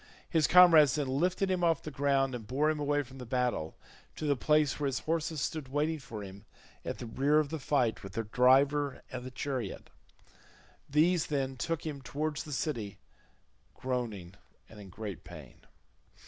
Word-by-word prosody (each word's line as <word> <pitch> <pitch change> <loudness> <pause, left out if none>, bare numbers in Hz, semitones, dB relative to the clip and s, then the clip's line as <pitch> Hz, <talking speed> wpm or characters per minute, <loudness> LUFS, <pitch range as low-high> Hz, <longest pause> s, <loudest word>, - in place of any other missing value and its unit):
His 160 -3 +2
comrades 165 -7 +7
then 145 - 0
lifted 180 +8 0
him 180 -1 0
off 165 -3 +2
the 155 - -6
ground 135 -1 +1
and 115 -4 -6
bore 145 +6 +1
him 155 - -3
away 145 0 +1
from 135 0 -13
the - - -6
battle 125 - -1 0.4
to - - -5
the 145 -1 +2
place 150 +2 +2
where 145 - 0
his 135 -1 -2
horses 160 -2 -2
stood 155 -4 -3
waiting 150 +4 -1
for 115 -5 -8
him 100 +1 -10 0.4
at - - -4
the - - -7
rear 140 +6 +2
of 155 -2 +2
the 160 +1 -4
fight 125 -4 0
with 95 -2 -9
their 115 - -2
driver 135 +5 +3
and 130 -1 -5
the 130 - -6
chariot; 130 -5 -5 1.0
these 160 +3 +3
then 135 -3 -1
took 165 +6 -3
him 145 -3 -5
towards 150 +4 -3
the 150 - -8
city 120 -8 -3 0.8
groaning 115 -9 -4 0.3
and 110 - -14
in 100 -2 -11
great 100 -1 -7
pain. 75 -7 -13
140 Hz, 180 wpm, -31 LUFS, 125-150 Hz, 1.0 s, comrades